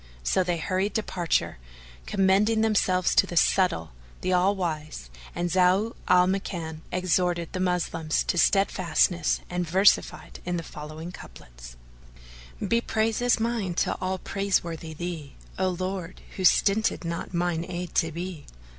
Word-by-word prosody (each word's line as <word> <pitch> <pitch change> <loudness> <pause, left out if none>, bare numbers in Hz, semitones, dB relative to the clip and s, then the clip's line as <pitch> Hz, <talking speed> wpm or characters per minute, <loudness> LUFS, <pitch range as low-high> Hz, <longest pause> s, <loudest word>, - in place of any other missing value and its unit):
So 185 - +2
they 175 -1 -1
hurried 185 +4 -1
departure, 175 - -1 0.5
commending 200 +3 +3
themselves 190 -4 +2
to - - +4
the 175 - -4
Subtle, 180 - +2 0.3
the 185 - 0
All 185 +3 +3
wise, 155 - -4 0.2
and 175 0 -1
Zau 185 +5 +3
al 180 0 +6
Makan 170 -4 -3
exhorted 180 -1 0
the 185 - -3
Moslems 175 -3 0
to - - -1
steadfast 185 -2 +3
ness 175 -1 -1
and 180 -1 -3
versified 190 +4 +2
in 175 0 -2
the 165 - -4
following 155 +3 -8
couplets,[FN#440] - - -12
"Be 235 0 +2
praises 225 +2 +1
mine 220 -6 -1
to - - 0
all 185 0 -1
praiseworthy 170 -5 -2
Thee, 165 -4 -6
* - - -17
O 190 0 +2
Lord, 185 0 -4
who 190 - -2
stinted 200 0 +3
not 170 0 -4
mine 170 -2 -1
aid 175 -1 -5
to 165 -2 +1
be! 170 -1 -6
180 Hz, 145 wpm, -26 LUFS, 160-190 Hz, 0.5 s, al